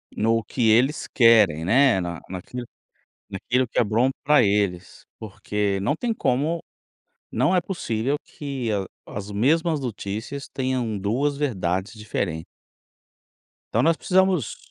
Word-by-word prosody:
No 115 +1 +1
que 115 +1 0
eles 125 +7 +3
querem, 110 - +5
né? 120 +2 +4
Na 85 -1 -4
naquilo 115 +7 -7 0.6
naquilo 125 +6 0
que - - -9
é - - +5
bom 115 +4 +2
pra 150 0 +5
eles, 100 -3 -1 0.2
porque 105 -1 -2
não 145 +9 +1
tem 235 +3 -1
como 160 - 0 0.7
não 185 - +2
é 180 - +3
possível 140 - -2
que 135 -5 -5
a 100 -2 -1 0.3
as 100 0 -5
mesmas 155 - +2
notícias 115 +2 -5
tenham 130 -5 -2
2 135 +9 0
verdades 95 -7 -1
diferentes. 95 -7 -3 1.3
Então - - +3
nós 165 +1 +3
precisamos 185 - +1
115 Hz, 130 wpm, -24 LUFS, 100-140 Hz, 1.3 s, querem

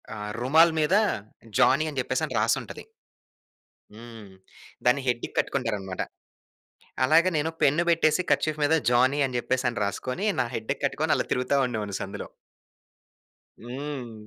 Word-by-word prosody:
ఆహ్, 105 0 -5
రుమాల్ 160 +6 +5
మీద 155 +5 +1 0.7
జానీ 140 +5 +4
అని 140 -3 -4
చెప్పేసి - - -2
రాసుంటది. - - -1 1.1
హ్మ్. 115 -3 -12 0.5
దాన్ని 125 +3 +3
హెడ్‌కి 120 -1 -1
కట్టుకుంటారనమాట. 105 -8 -2 1.0
అలాగ 165 +6 +5
నేను 155 +2 0
పెన్ 145 +4 +4
పెట్టేసి 165 +1 +3
కర్చీఫ్ 155 -1 +1
మీద 150 +2 +3 0.2
జానీ 130 +4 +3
అని 125 -1 -4
చెప్పేసని 120 0 -1
రాసుకొని, 125 - -3
నా 125 - +1
హెడ్‌కి 110 - -4
కట్టుకొని - - +1
అలా - - -2
తిరుగుతా 125 +3 +1
ఉండేవాడిని 105 -5 -4
సందులో. 100 - -6 1.3
హ్మ్. 130 -1 -6
130 Hz, 120 wpm, -26 LUFS, 115-150 Hz, 1.3 s, రుమాల్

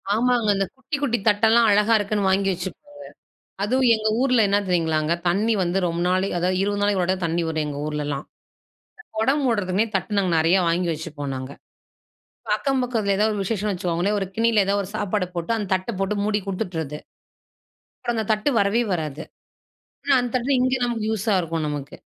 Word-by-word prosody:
ஆமாங்க. 240 0 +2
இந்த 195 0 0
குட்டி 280 +3 -4
குட்டி 245 -5 +1
தட்டெல்லாம் 225 +2 +4
அழகா 210 +2 +3
இருக்குன்னு 205 -1 0
வாங்கி 195 +1 +2
வச்சிருப்பாங்க. 290 - -8 0.6
அதுவும் 255 +3 +2
எங்க 215 0 -2
ஊர்ல 255 -3 +3
என்ன 200 +1 +3
தெரியுங்களாங்க, 160 -3 +1
தண்ணீ 210 +6 +2
வந்து 175 +2 -1
ரொம்ப 170 0 -1
நாள் 185 +1 +2
அதாவது 180 +1 0
20 205 0 -1
நாளைக்கு 205 -2 +2
ஒரு 180 - -2
தடவ 190 0 -2
தண்ணீ 170 +1 0
வரும் 160 -1 -1
எங்க 145 - -5
ஊர்ல்லாம். 145 -2 -3 0.9
கொடம் 270 +6 +2
மூடுறதுமே 205 -4 +1
தட்டு 190 +2 -1
நாங்க 185 -3 +1
நிறையா 165 +4 +4
வாங்கி 175 +1 0
வச்சுப்போம் 150 -3 -5
நாங்க. 130 +1 -6 1.0
அக்கம் 270 -2 0
பக்கத்தில 225 -5 0
ஏதாவது 215 +1 +2
ஒரு 200 - -1
விசேஷம்னு 210 0 -1
வச்சுக்கோங்களேன் 180 +3 -1
ஒரு 195 - -2
கிண்ணியில 225 -2 +3
ஏதாவது 200 +1 +1
ஒரு 185 - -8
சாப்பாடு 205 -2 -1
போட்டு 170 +7 -1
அந்த 210 -3 -3
தட்ட 185 +4 -2
போட்டு 195 +2 0
மூடி 210 0 +1
குடுத்துட்டறது. 175 -7 -4 1.3
தட்டு 215 +6 +1
வரவே 200 +4 +2
வராது. 155 -3 -3 0.8
ஆனா 280 -1 +4
அந்த 245 - -3
தட்டுதான் 255 +2 +1
இங்க 255 +1 +2
நமக்கு 235 -3 -2
யூஸா 215 0 0
இருக்கும் 165 -2 -3
நமக்கு. 145 -1 -5
200 Hz, 170 wpm, -23 LUFS, 175-225 Hz, 1.3 s, தட்டெல்லாம்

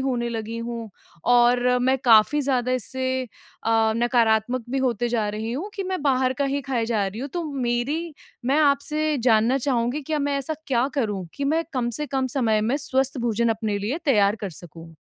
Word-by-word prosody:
होने 250 -3 -1
लगी 225 -1 -4
हूँ 230 -1 -5 0.4
और 245 0 +5 0.2
मैं 260 +1 +3
काफ़ी 230 +5 +5
ज़्यादा 255 -3 0
इससे 260 +1 -2
अ, 225 -2 -1
नकारात्मक 235 0 +2
भी 270 - 0
होते 240 -3 0
जा 225 -3 0
रही 215 +2 -4
हूँ 330 +12 -4
कि 395 - -3
मैं 370 -2 -3
बाहर 260 -2 +2
का - - +3
ही 280 +1 -1
खाए 250 -3 -1
जा 215 -4 0
रही 200 +4 -6
हूँ, 275 - -4
तो 340 +4 -4
मेरी 275 +6 -2 0.3
मैं 270 +4 +2
आपसे 300 +1 +1
जानना 235 +1 +3
चाहूँगी 250 0 0
क्या 305 +2 -2
मैं 285 -1 0
ऐसा 275 +3 -3
क्या 255 -2 +2
करूँ 205 -9 -1
कि 280 - -3
मैं 320 +4 +1
कम 245 -3 -1
से 300 - -1
कम 265 -2 -1
समय 220 -5 +2
में 230 +6 +1
स्वस्थ 270 -1 -1
भोजन 235 -1 +1
अपने 220 -2 -1
लिए 220 +10 -2
तैयार 210 -6 +4
कर 200 -2 -5
सकूँ? 165 0 -12
245 Hz, 195 wpm, -24 LUFS, 225-275 Hz, 0.4 s, और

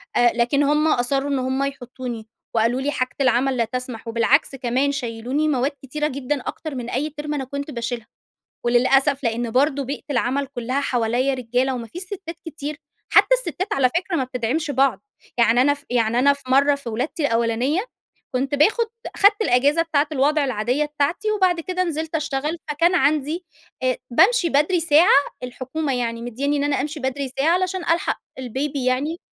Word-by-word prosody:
أ 240 0 +5
لكن 245 +4 +2
هم 300 +2 +2
أصرّوا 270 +1 +1
إن 275 -2 0
هم 260 +2 -1
يحطّوني 250 -4 -6 0.3
وقالوا: 230 +4 +2
"لي 290 +2 0
حاجة 255 -2 -2
العمل 260 0 +2
لا 230 - +2
تسمح." 250 -1 -6
وبالعكس 245 +5 +2
كمان 260 +2 0
شيّلُوني 255 +3 -2
مواد 275 -1 +1
كتيرة 300 +3 -2
جدًا 280 0 -2
أكتر 310 +1 -6
من 245 -1 -5
أي 290 +5 -1
ترم 295 0 -5
أنا 275 -2 -2
كنت 280 +3 -5
باشيلها. 235 -2 -4 0.6
وللأسف 270 +3 +3
لإن 230 0 -1
برضه 280 +2 +2
بيئة 280 +3 -5
العمل 260 +3 0
كُلّها 260 +1 -2
حواليّا 245 +1 0
رجالة 255 +1 0
وما 235 -2 -6
فيش 355 +8 -8
سِتّات 365 -3 -7
كتير. 300 -1 -6 0.3
حتّى - - +6
السِتّات 415 -5 -3
على 260 -2 +3
فكرة 360 0 -2
ما 265 - +1
بتدعمش 255 +5 -2
بعض. 270 0 +2 0.4
يعني 235 +1 +4
أنا 285 +2 +4
ف 285 - -13
يعني 235 -1 +1
أنا 280 +2 +5
في 280 - -13
مرّة 280 +2 +5
في 280 -4 -7
ولادتي 280 - -2
الأولانية، 235 - 0 0.5
كنت 270 +3 0
باخُد 440 - +3 0.3
أخدت 410 +2 +4
الأجازة 285 - +3
بتاعة 310 -3 +1
الوضع 295 +2 +2
العادية 255 +4 0
بتاعتي 300 +9 -1
وبعد 370 -4 +2
كده 365 +2 -1
نزلت 320 -1 -3
اشتغل، 300 +2 -2
فكان 335 +5 +2
عندي 305 +3 +1 0.4
آآ 255 -1 +1
بامشي 380 - +4
بدري 300 +6 +2
ساعة، 320 +1 +5 0.3
الحكومة 265 +3 -3
يعني 230 -2 -2
مدّيانّي 275 +5 -1
إن 285 - 0
أنا 290 -2 +1
أمشي 300 +2 -4
بدري 265 +1 -2
ساعة 340 +6 +3
عشان 370 0 -2
ألحق 335 +1 0 0.2
البيبي 265 +2 -3
يعني 285 +7 0
275 Hz, 175 wpm, -22 LUFS, 250-300 Hz, 0.6 s, حتّى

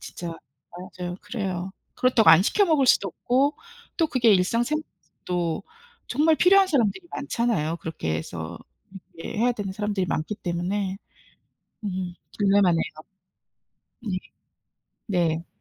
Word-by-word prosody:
진짜 170 -1 -7 0.7
맞아요. 180 0 -4
그래요. 190 -5 -4 0.2
그렇다고 250 -3 +5
안 170 +3 +8
시켜 405 - +3
먹을 310 -6 +3
수도 200 -5 +4
없고 270 - +1 0.4
또 325 - +3
그게 235 -5 +4
일상생활에서도 185 - -2 0.4
정말 310 +5 +3
필요한 385 +3 +6
사람들이 290 - +1
많잖아요. 230 - -1
그렇게 80 - -3
해서 80 +1 -6 0.6
이렇게 165 - -7
해야 245 +2 +3
되는 205 -4 -4
사람들이 205 -2 -1
많기 160 +7 -2
때문에 185 +3 -2 0.9
음 185 -3 -3 0.2
딜레마네요. 195 -5 +4 1.2
네. 200 -5 -3 0.9
네. 170 -4 0
200 Hz, 280 characters per minute, -25 LUFS, 175-245 Hz, 1.2 s, 안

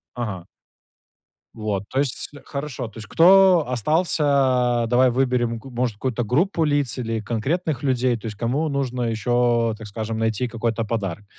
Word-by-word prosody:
Ага. 105 -8 -4 1.1
Вот, 105 -3 -3
то 135 - -1
есть 140 -4 -1 0.2
хорошо, 140 -4 -5
то 110 - -14
есть 105 -2 -9
кто 185 - +6
остался 130 - +1
Давай 125 +1 +4
выберем 125 -2 0
г 135 +4 -11
может 120 -3 -2
какую-то 120 +1 -2
группу 165 - +1
лиц 145 -5 0
или 115 -2 -2
конкретных 135 - -2
людей, 130 -2 +1
то 115 - -13
есть 105 - -6
кому 135 +8 -1
нужно 130 -3 -2
еще, 115 0 +1
так 110 -1 -9
скажем, 110 +2 -4
найти 110 +2 0
какой-то 115 0 -2
подарок. 105 -3 -3
120 Hz, 155 wpm, -22 LUFS, 110-140 Hz, 1.1 s, кто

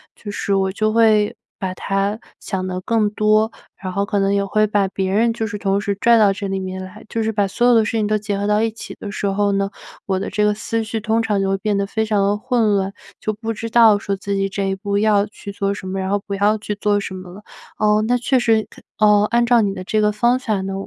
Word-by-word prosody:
就 210 - -9
是 200 0 -2
我 190 -1 +1
就 215 +2 0
会 220 -2 +3 0.2
把 185 -1 -3
它 195 +3 -1 0.2
想 190 -2 -4
得 185 0 -4
更 215 +1 +1
多， 215 +1 +2 0.3
然 185 -1 -4
后 200 +1 0
可 205 0 -2
能 195 0 +1
也 200 - +1
会 215 +2 +2
把 205 -2 +1
别 190 0 -2
人 230 +3 +3
就 225 -1 -3
是 205 -1 -4
同 195 0 +1
时 200 0 -1
拽 235 +3 +4
到 205 -3 +4
这 200 0 -5
里 195 0 -2
面 185 0 -5
来， 185 - -11
就 225 - -3
是 220 - 0
把 205 -2 +1
所 240 +5 +1
有 245 - +6
的 225 - +5
事 - - -2
情 210 -1 +1
都 215 - +1
结 205 -1 -3
合 205 - -1
到 210 +1 +2
一 225 - 0
起 225 - -9
的 200 - -6
时 205 - -2
候 200 +1 +1
呢， 195 0 0 0.4
我 190 -1 0
的 - - -4
这 210 - 0
个 210 - +3
思 225 +2 -2
绪 225 0 -3
通 220 +2 0
常 210 -3 0
就 195 - 0
会 195 - +1
变 205 0 0
得 200 - 0
非 220 +2 -1
常 215 -2 +1
的 200 +1 +2
混 230 -2 +1
乱， 195 0 0 0.3
就 215 - -2
不 225 +1 -4
知 230 +1 -6
道 225 -3 +6
说 200 - -2
自 200 +1 -3
己 195 0 0
这 200 +1 -3
一 195 - -1
步 200 +1 -2
要 205 -1 +3
去 205 -1 -9
做 200 0 -1
什 190 - -8
么， 190 +1 -3
然 190 0 -2
后 205 0 +1
不 200 - -5
要 205 +2 +2
去 210 0 -4
做 205 0 +1
什 195 - -6
么 185 -1 -9
了。 200 +4 -12 0.3
哦， 215 0 +2
那 245 - +2
确 255 +2 +1
实 225 -3 +2
可 - - -16 0.2
呃， 210 -1 +5
按 235 0 +3
照 240 -1 +4
你 200 -2 0
的 185 - -6
这 215 +3 0
个 210 0 +3
方 240 +4 +2
法 215 -6 -1
呢， 195 0 -4
205 Hz, 300 characters per minute, -20 LUFS, 195-220 Hz, 0.4 s, 有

